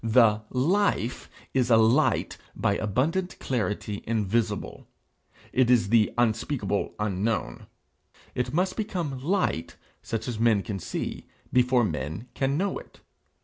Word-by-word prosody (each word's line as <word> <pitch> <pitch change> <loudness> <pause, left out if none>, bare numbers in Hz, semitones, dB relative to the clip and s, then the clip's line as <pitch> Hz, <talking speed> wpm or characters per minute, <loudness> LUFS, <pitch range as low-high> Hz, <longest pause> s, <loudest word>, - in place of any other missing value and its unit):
The 110 -2 +4
life 140 - 0 0.2
'is 125 -2 +2
a 115 - +6
light 110 +1 +3 0.2
by 100 - +1
abundant 150 - -1
clarity 105 -4 -2
invisible;' 110 -1 -1 0.7
it 130 -2 +3
is 115 -6 +4
the 110 -1 +4
unspeakable 110 -2 0
unknown; 105 - -2 0.7
it 125 - -2
must 185 +4 0
become 175 - -3
light 180 - 0 0.3
such 115 +1 -4
as 120 -3 -3
men 110 -4 +3
can 100 -3 -4
see - - -5 0.3
before 125 0 +4
men 80 - -3
can 135 +2 0
know 195 +3 -1
it. - - -17
115 Hz, 125 wpm, -27 LUFS, 105-135 Hz, 0.7 s, a